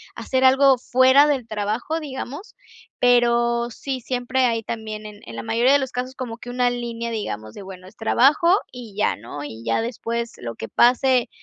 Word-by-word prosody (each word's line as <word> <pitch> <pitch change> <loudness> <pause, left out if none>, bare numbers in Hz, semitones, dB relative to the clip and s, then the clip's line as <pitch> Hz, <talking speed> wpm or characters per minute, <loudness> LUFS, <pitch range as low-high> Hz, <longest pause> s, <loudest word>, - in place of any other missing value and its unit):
hacer 260 0 -1
algo 265 0 +5
fuera 260 +3 +5
del 265 -6 -1
trabajo, 220 +9 -2
digamos. 290 - -7 0.5
Pero 235 -1 +3
sí, 265 +2 -5
siempre 250 +1 -1
hay 230 -2 0
también, 215 -1 -6
en 210 -1 -11
en 115 - -9
la 115 - -5
mayoría 240 - +3
de 285 - +5
los 265 -2 -4
casos, 255 +1 -4
como 240 -3 -6
que 245 - -10
una 245 0 +1
línea, 235 -1 -4
digamos, 110 - -5
de - - -10
bueno, 185 -1 -11
es 210 - -16
trabajo, 285 - +4 0.2
y 235 -5 -10
ya, 210 - +1
¿no? 145 +7 -8
Y 115 -5 -8
ya 115 - +1
después, 235 0 -4
lo 115 -2 -6
que 110 - -7
pase 250 0 +3
240 Hz, 190 wpm, -22 LUFS, 215-260 Hz, 0.5 s, algo